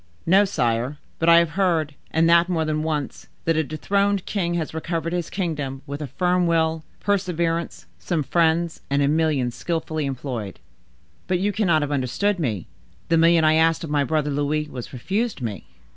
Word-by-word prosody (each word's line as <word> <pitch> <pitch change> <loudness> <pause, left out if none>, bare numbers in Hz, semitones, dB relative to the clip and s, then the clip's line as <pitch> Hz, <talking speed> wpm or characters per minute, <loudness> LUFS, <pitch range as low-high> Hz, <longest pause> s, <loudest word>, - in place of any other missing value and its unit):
"No, 195 +4 +5
sire; 125 - -1 0.2
but 165 - +3
I 170 - +8
have 170 -2 +3
heard—and 165 -3 0
that 170 +1 +5
more 165 -3 0
than 155 0 -1
once—that 155 +1 -3
a 160 - +2
dethroned 200 +6 0
king 175 -4 -1
has 160 -3 -3
recovered 165 +1 -3
his 175 -2 -2
kingdom 145 -8 -3
with 145 +1 -6
a 150 - -3
firm 180 +5 +1
will, 160 -1 +1 0.2
perseverance, 170 - -1
some 150 - -1
friends, 165 +2 +1
and 140 +1 +2
a - - +3
million 150 -5 +1
skillfully 155 +1 -3
employed." 125 -7 -5 0.7
"But 180 -1 +1
you 200 +3 0
cannot 175 -7 +2
have 145 - -3
understood 145 +9 0
me. 110 - -2 0.4
The 165 - +4
million 165 0 +5
I 155 0 +5
asked 165 +1 +3
of 160 - -5
my 145 -1 +2
brother 150 0 0
Louis 145 +2 0
was 125 -2 -7
refused 200 - -2
me." 110 -5 -5
160 Hz, 175 wpm, -23 LUFS, 145-170 Hz, 0.7 s, I